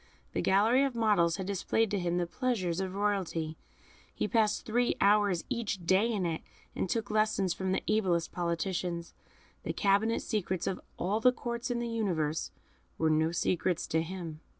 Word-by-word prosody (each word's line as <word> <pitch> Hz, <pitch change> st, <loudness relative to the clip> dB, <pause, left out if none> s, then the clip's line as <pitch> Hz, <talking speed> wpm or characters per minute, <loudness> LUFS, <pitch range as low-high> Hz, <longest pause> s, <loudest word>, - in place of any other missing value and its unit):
The -, -, 0 dB
gallery 220 Hz, +7 st, +4 dB
of 270 Hz, -3 st, -1 dB
models 205 Hz, -8 st, +3 dB
had 190 Hz, -, -4 dB
displayed 200 Hz, +3 st, 0 dB
to 205 Hz, -, 0 dB
him 175 Hz, -1 st, 0 dB
the 175 Hz, -, +1 dB
pleasures 185 Hz, -5 st, -1 dB
of 190 Hz, -1 st, -3 dB
royalty; 190 Hz, -6 st, -1 dB, 0.6 s
he -, -, -2 dB
passed 215 Hz, -1 st, +1 dB
three 240 Hz, +2 st, +1 dB
hours 200 Hz, -3 st, +3 dB
each 215 Hz, -8 st, -3 dB
day 195 Hz, +6 st, +3 dB
in 200 Hz, -5 st, -1 dB
it, 165 Hz, -2 st, -2 dB, 0.3 s
and 190 Hz, -, -2 dB
took 220 Hz, 0 st, -1 dB
lessons 215 Hz, -4 st, +2 dB
from 190 Hz, +1 st, -2 dB
the 190 Hz, -, 0 dB
ablest 180 Hz, -6 st, +1 dB
politicians. 170 Hz, 0 st, -2 dB, 0.5 s
The -, -, -3 dB
cabinet 205 Hz, +3 st, +2 dB
secrets 190 Hz, -4 st, -2 dB
of 190 Hz, -, -2 dB, 0.2 s
all 200 Hz, +5 st, 0 dB
the 250 Hz, +3 st, +5 dB
Courts 240 Hz, 0 st, -4 dB
in 245 Hz, -, 0 dB
the 235 Hz, 0 st, -2 dB
universe 175 Hz, -10 st, -1 dB, 0.5 s
were 160 Hz, -1 st, +2 dB
no 160 Hz, +1 st, +2 dB
secrets 175 Hz, 0 st, 0 dB
to 160 Hz, -, +2 dB
him. 165 Hz, -2 st, -6 dB
190 Hz, 175 wpm, -31 LUFS, 170-220 Hz, 0.6 s, the